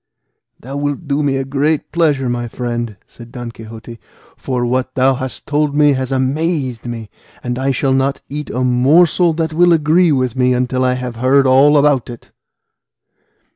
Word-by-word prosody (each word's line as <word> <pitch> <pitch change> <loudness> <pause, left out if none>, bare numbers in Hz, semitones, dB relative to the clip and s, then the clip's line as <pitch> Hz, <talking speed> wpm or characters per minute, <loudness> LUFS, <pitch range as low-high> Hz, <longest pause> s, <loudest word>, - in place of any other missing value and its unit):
"Thou 135 +3 -7
wilt 145 +2 -3
do 140 +1 0
me 140 -2 0
a 135 - -3
great 145 +3 -1
pleasure, 150 -5 +1
my 120 0 -2
friend," 120 -3 -4
said 120 -1 -14
Don 120 -2 -7
Quixote, 115 +1 -11 0.4
"for 125 -2 -3
what 130 +1 -2
thou 130 +1 +3
hast 130 -4 -6
told 150 0 0
me 145 -1 +4
has 130 0 -3
amazed 135 -2 -1
me, 115 -3 -7 0.3
and 125 0 -3
I 135 +1 0
shall 135 +1 0
not 135 +1 0
eat 150 +2 -6
a 125 - -2
morsel 150 +8 +3
that 160 0 -2
will 175 +2 +4
agree 165 +2 +3
with 130 -3 0
me 125 -1 +2
until 125 +1 -1
I 125 0 +2
have 125 -2 -5
heard 135 +3 +3
all 135 +3 +5
about 140 -4 +2
it." 120 -2 -11
130 Hz, 175 wpm, -16 LUFS, 125-145 Hz, 0.4 s, all